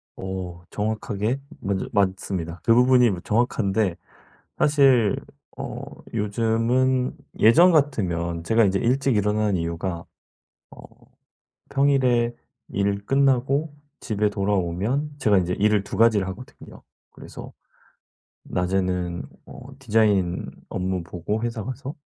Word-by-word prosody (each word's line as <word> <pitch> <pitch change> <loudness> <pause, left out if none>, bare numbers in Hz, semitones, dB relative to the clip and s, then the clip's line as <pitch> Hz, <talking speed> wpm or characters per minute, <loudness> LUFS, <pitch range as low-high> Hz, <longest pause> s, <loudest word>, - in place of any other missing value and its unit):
어. 95 -2 -6
정확하게 110 +3 -2 0.2
먼저 95 -1 -2
맞습니다. 95 -3 -1
그 115 - +4
부분이 125 -1 +5
뭐 90 -3 -3
정확한데 105 -4 0 0.6
사실 135 -8 +4 0.4
어 - - -6 0.3
요즘은 115 +5 +1 0.2
예전 170 +12 +7
같으면 85 - 0
제가 115 +5 +3
인제 100 0 +2
일찍 130 0 +1
일어나는 105 -1 +1
이유가 85 +1 -3 0.7
어 - - -13 0.9
평일에 130 -4 +2 0.3
일 100 +1 -1
끝나고 135 +2 +2 0.3
집에 105 -1 0
돌아오면 100 - -1
제가 105 -6 +3
인제 90 0 0
일을 105 -1 +2
2 - - -6
가지를 110 -4 +4
하거든요. 100 +7 -11 0.3
그래서 - - -11 0.9
낮에는 90 -1 -1 0.2
어 - - -11 0.2
디자인 105 -7 +1 0.2
업무 95 -1 -2
보고 105 +7 -4
회사 115 -3 -3
가서 130 +4 -6
105 Hz, 240 characters per minute, -24 LUFS, 95-125 Hz, 0.9 s, 예전